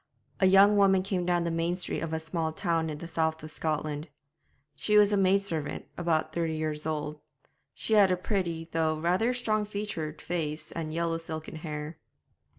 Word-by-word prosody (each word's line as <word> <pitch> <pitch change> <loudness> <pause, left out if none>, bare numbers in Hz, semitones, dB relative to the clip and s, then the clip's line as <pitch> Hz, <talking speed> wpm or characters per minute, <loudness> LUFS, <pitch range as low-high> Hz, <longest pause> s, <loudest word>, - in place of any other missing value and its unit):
A 190 - +5
young 200 +2 +7
woman 195 -2 +5
came 185 -2 -1
down 175 -1 +2
the 170 - -1
main 165 +2 0
street 180 - -2
of 165 - -4
a 160 - -1
small 160 0 -2
town 165 -1 0
in 150 - -4
the 170 - -7
south 160 -1 -1
of 155 - -8
Scotland. 155 0 -2 0.7
She 210 +9 +2
was 205 0 +6
a - - +5
maid 195 0 +3
servant, 155 -7 -2
about 165 -2 0
thirty 165 -2 -1
years 155 -1 -3
old; 150 -1 -3 0.6
she 220 - -1
had 205 -3 +6
a 185 - +2
pretty, 175 -4 -2
though 160 -1 +1
rather 180 +9 +2
strong 220 -4 0
featured, 200 -7 -4
face, 155 -3 -3
and 160 -2 -4
yellow 165 0 -1
silken 160 -1 -6
hair. 155 0 -6
165 Hz, 185 wpm, -29 LUFS, 155-190 Hz, 0.7 s, young